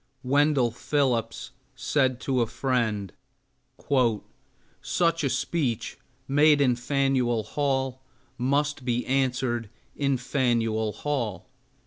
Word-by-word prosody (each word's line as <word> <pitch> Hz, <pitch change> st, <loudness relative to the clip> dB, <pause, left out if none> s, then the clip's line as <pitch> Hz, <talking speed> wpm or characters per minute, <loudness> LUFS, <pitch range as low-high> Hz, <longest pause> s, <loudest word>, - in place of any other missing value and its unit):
Wendell 140 Hz, -2 st, +3 dB
Phillips 120 Hz, -3 st, -1 dB, 0.2 s
said 130 Hz, -2 st, +1 dB
to 130 Hz, -2 st, 0 dB
a 115 Hz, -, +1 dB
friend, 110 Hz, -7 st, -1 dB, 1.7 s
"Such 165 Hz, -2 st, +1 dB
a 140 Hz, -, +1 dB
speech 130 Hz, -2 st, -2 dB, 0.3 s
made 145 Hz, +2 st, +5 dB
in 130 Hz, -3 st, +3 dB
Faneuil 125 Hz, -3 st, 0 dB
Hall 135 Hz, +1 st, -1 dB, 0.3 s
must 140 Hz, +2 st, 0 dB
be 120 Hz, 0 st, -1 dB
answered 125 Hz, -4 st, 0 dB, 0.3 s
in 140 Hz, -2 st, +1 dB
Faneuil 115 Hz, -4 st, 0 dB
Hall." 115 Hz, -9 st, -3 dB
130 Hz, 95 wpm, -26 LUFS, 120-140 Hz, 1.7 s, made